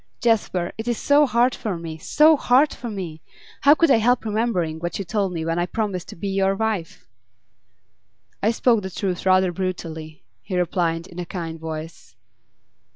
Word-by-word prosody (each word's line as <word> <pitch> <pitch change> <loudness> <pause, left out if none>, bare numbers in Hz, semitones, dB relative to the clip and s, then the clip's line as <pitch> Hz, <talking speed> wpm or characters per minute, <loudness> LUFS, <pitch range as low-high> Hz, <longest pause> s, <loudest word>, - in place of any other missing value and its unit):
'Jasper, 205 -6 +1
it 220 - -5
is 240 -2 0
so 290 +1 +4
hard 245 +1 +2
for 205 -6 -4
me! 165 -1 -6
So 310 - +5
hard 270 +1 +3
for 240 - -7
me! 175 -7 -6 0.4
How 285 +2 +7
could 330 -1 +3
I - - +6
help 240 +2 +2
remembering 210 -8 -1
what 175 +1 -3
you 195 - -4
told 195 +1 -1
me 165 -2 -4
when 165 +1 -1
I 175 - 0
promised 200 -4 -3
to - - -9
be 195 +4 -4
your 195 0 +1
wife?' 200 - -3 1.3
'I 210 - +3
spoke 230 -1 +2
the 190 - -5
truth 190 -1 -3
rather 185 -1 +4
brutally,' 165 -4 -5 0.2
he 180 - -4
replied, 170 -1 0
in 180 -1 -11
a 175 - -3
kind 165 -3 -5
voice. 160 -4 -8
190 Hz, 180 wpm, -22 LUFS, 170-225 Hz, 1.3 s, How